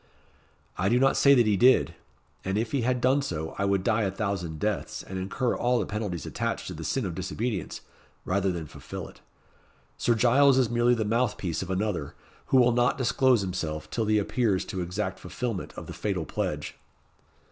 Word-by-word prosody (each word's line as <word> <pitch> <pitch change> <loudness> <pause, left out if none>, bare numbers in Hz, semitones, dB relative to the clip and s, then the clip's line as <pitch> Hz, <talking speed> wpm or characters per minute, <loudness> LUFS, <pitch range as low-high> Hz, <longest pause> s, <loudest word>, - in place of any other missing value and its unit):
"I 95 +2 +2
do 120 +3 +3
not 135 0 +4
say 140 0 +6
that 120 -3 +4
he 105 -1 +3
did; 125 +6 +4 0.5
and 95 +2 -1
if 110 +1 -1
he 140 - +1
had 125 +1 0
done 130 +3 +3
so, 80 - -4
I 100 - +1
would 100 -1 +1
die 110 +3 +2
a 100 - +1
thousand 95 -5 -3
deaths, 105 -2 -2
and 95 0 -6
incur 110 +7 -1
all 125 +1 +1
the - - 0
penalties 105 -6 -4
attached - - -3
to - - -5
the - - -7
sin 135 -5 -1
of 90 - -3
disobedience, 95 +4 -3 0.4
rather 95 +1 +1
than 85 -3 -4
fulfil - - -8
it. - - -16 0.8
Sir 120 - +2
Giles 130 +4 +5
is 125 -4 +2
merely 120 +1 +3
the 110 -2 -1
mouth 115 +2 +1
piece 85 -4 -3
of 95 - -6
another, 95 -6 -2 0.3
who 130 - +3
will 125 -1 +5
not 120 +1 +2
disclose 130 -1 +3
himself 85 -5 -4
till 115 - -1
he 110 0 +3
appears 105 -2 +1
to 95 - -4
exact 95 +3 -3
fulfilment 105 +2 -4
of - - -7
the - - -8
fatal 95 -6 -2
pledge." - - -3
105 Hz, 200 wpm, -27 LUFS, 95-120 Hz, 0.8 s, say